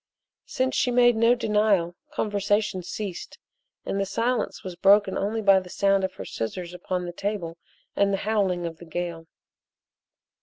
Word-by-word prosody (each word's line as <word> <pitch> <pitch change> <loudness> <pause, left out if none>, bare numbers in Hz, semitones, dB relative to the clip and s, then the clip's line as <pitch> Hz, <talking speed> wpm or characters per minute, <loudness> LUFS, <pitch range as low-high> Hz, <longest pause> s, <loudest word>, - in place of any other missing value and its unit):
Since 260 0 -1
she 250 - +2
made 240 -1 +5
no 230 +2 +4
denial, 210 -7 +1 0.2
conversation 205 -5 0
ceased, 185 +1 -6 0.5
and 195 - -2
the - - 0
silence 235 +5 -1
was 185 -2 -6
broken 195 +2 +4
only 215 +3 -1
by 195 -1 +6
the 185 -1 -11
sound 195 +1 +2
of 190 0 -2
her - - -7
scissors 175 +10 -5
upon 180 0 -3
the 175 - -6
table 180 -4 -4 0.4
and 200 0 +2
the 195 - +1
howling 195 -5 +1
of 165 -1 -5
the 170 - -12
gale. 165 0 -5
195 Hz, 160 wpm, -25 LUFS, 175-215 Hz, 0.5 s, by